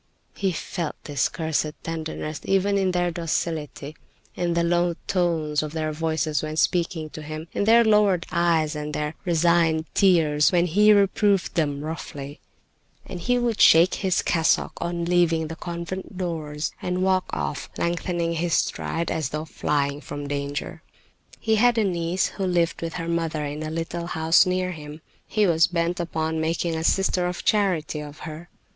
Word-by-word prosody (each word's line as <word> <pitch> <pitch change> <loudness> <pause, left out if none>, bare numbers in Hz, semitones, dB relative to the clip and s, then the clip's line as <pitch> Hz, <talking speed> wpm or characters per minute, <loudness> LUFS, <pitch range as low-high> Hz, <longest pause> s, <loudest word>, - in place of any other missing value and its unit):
He 195 -2 -1
felt 170 -1 -4
this 145 -3 0
cursed 160 -2 -1
tenderness, 160 -2 -5
even 195 +1 +2
in 190 -1 +1
their 175 -1 0
docility, 160 -3 -3 0.4
in 175 -1 -1
the 170 - +2
low 175 0 +1
tones 165 -5 0
of 155 0 -5
their 155 -1 -2
voices 160 -1 -1
when 155 0 -5
speaking 165 -2 0
to 155 - -8
him, 155 +2 -7
in 200 - 0
their 230 +2 +6
lowered 210 -5 +3
eyes, 165 -3 +2
and 150 0 -4
in - - -5
their 150 +1 -2
resigned 165 -2 +2
tears 160 -6 +4
when 175 -1 +3
he 210 +5 +5
reproved 200 -1 +3
them 145 -4 0
roughly. 145 -3 -6 0.7
And 180 - -7
he 245 +8 +1
would 240 -3 0
shake 170 +3 +7
his 190 -3 0
cassock 165 -2 +2
on 170 0 -2
leaving 170 -2 +2
the 165 - -5
convent 175 +3 -6
doors, 160 -4 -3
and 180 +1 -1
walk 185 -1 +2
off, 75 -2 -3
lengthening 170 0 -1
his 165 0 0
stride 165 0 -1
as 155 -5 -1
though 155 +2 -4
flying 145 -2 -1
from 145 -1 -6
danger. 140 0 -4 0.6
He 220 -1 +1
had 240 +1 +4
a 220 - +3
niece 175 -1 0
who 195 - -4
lived 175 -2 +1
with 165 -1 -4
her 165 -1 -4
mother 165 -2 -1
in 145 +1 -5
a 155 - -3
little 165 +1 -4
house 165 +2 +4
near 185 0 0
him. 150 -1 -9 0.3
He 215 -1 +2
was 165 -3 +4
bent 175 +1 -1
upon 160 -1 -2
making 165 +1 -1
a 160 - -3
sister 180 0 +2
of 180 0 -5
charity 180 -8 +1
of 150 0 -9
her. 160 +2 -8
165 Hz, 170 wpm, -24 LUFS, 155-180 Hz, 0.7 s, shake